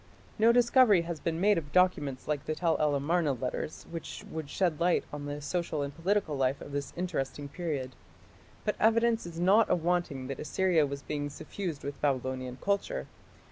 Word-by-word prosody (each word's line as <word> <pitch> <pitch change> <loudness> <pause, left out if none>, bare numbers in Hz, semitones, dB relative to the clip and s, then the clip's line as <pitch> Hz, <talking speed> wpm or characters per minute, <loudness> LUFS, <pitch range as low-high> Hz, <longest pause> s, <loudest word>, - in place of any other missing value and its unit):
No 225 +2 +6
discovery 240 -5 +5
has 170 -2 -4
been 165 +1 -2
made 205 0 +4
of 145 -3 -11
documents 150 -8 +2
like 150 -2 -1
the 155 - -2
Tell 165 0 +1
el 150 -2 +2
Amarna 150 +1 +1
"letters", 130 +4 -4
which 165 -1 -7
would 160 -3 -5
shed 175 -3 0
light 175 +1 +3
on 145 -1 -5
the 145 0 -4
social 160 -2 -2
and 140 0 -5
political 175 -2 0
life 135 0 +1
of - - -9
this 140 0 -3
interesting 145 -5 -3
period. 140 -5 -3 0.7
But - - 0
evidence 230 -2 +3
is 170 -1 -7
not 200 +5 +5
awanting 175 -6 0
that 135 0 -5
Assyria 165 -1 +2
was 140 0 -6
being 145 -1 -3
suffused 165 +1 -5
with 140 0 -6
Babylonian 130 -2 -1
culture. 200 - -1
160 Hz, 180 wpm, -30 LUFS, 140-180 Hz, 0.7 s, No